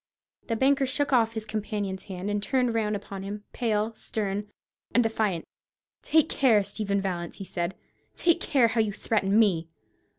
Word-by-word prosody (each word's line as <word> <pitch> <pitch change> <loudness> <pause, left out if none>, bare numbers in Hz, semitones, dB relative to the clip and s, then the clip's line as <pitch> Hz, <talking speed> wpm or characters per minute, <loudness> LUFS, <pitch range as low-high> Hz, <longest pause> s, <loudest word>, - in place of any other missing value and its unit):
The 230 - 0
banker 270 +3 +3
shook 285 +1 0
off 225 -2 +4
his 220 -1 -4
companion's 210 -3 -3
hand, 190 -1 -5
and 205 0 0
turned 250 +1 +1
round 215 -2 0
upon 200 -1 -6
him, 205 +1 -6
pale, 220 -1 0
stern, 205 -2 -3 0.5
and 245 - +6
defiant. 215 -6 0 0.6
"Take 315 -1 +3
care, 235 -10 +4
Stephen 200 0 -1
Vallance," 175 -3 -3
he 195 - -6
said; 175 0 -3 0.4
"take 340 -1 +3
care 250 -5 +3
how 225 0 +2
you 210 -2 -1
threaten 205 -1 +1
me. 180 -7 +3
215 Hz, 165 wpm, -27 LUFS, 195-230 Hz, 0.6 s, and